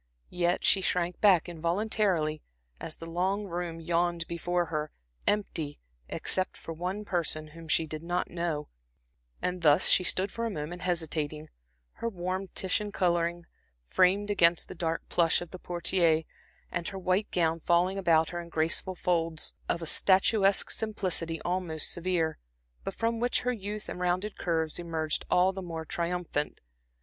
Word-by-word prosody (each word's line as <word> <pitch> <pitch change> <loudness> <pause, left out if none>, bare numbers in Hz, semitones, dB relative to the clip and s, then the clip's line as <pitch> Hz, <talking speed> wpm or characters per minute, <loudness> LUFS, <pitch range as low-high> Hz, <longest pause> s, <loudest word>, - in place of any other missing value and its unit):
Yet 175 0 +1
she 195 - +4
shrank 180 -1 0
back 190 -6 +6
involuntarily, 170 -2 0 0.4
as 155 - -3
the 165 - -8
long 185 +5 0
room 175 -2 -4
yawned 170 0 0
before 175 +1 0
her, 155 -2 -2 0.4
empty, 165 -8 0 0.3
except 185 0 -1
for 165 - -7
one 185 +6 -3
person 155 -4 -1
whom 165 +1 -11
she 160 +1 +3
did 155 0 -6
not 175 +2 -1
know; 170 -4 -2 0.8
and 180 0 -1
thus 150 -2 +5
she 185 - +6
stood 190 +2 +1
for 230 - -4
a 230 - 0
moment 175 -2 -5
hesitating, 155 -3 -2 0.4
her 230 - -3
warm 185 0 -3
Titian 205 +2 0
coloring 175 -2 +1 0.4
framed 195 - +3
against 170 -4 +4
the - - -5
dark 165 -1 -2
plush 165 -2 +3
of 175 -1 -8
the 185 - -8
portiere, 170 -2 +2 0.5
and 170 -1 -2
her 195 - -4
white 190 +2 +1
gown 165 -2 +1
falling 180 +4 +2
about 165 -4 +4
her 175 -1 -4
in 170 - -10
graceful 165 +4 0
folds, 165 -3 0 0.2
of 170 - 0
a - - -3
statuesque 195 +4 +3
simplicity 185 -6 -2
almost 175 -4 -1
severe, 170 -2 0 0.4
but - - -4
from 230 0 0
which 245 +1 +1
her 250 0 0
youth 210 -1 -5
and - - -5
rounded 180 +4 0
curves 160 -2 0
emerged 160 -2 -1
all 185 +2 +4
the 190 - -5
more 165 -3 -5
triumphant. 170 -3 -2
175 Hz, 160 wpm, -29 LUFS, 165-185 Hz, 0.8 s, back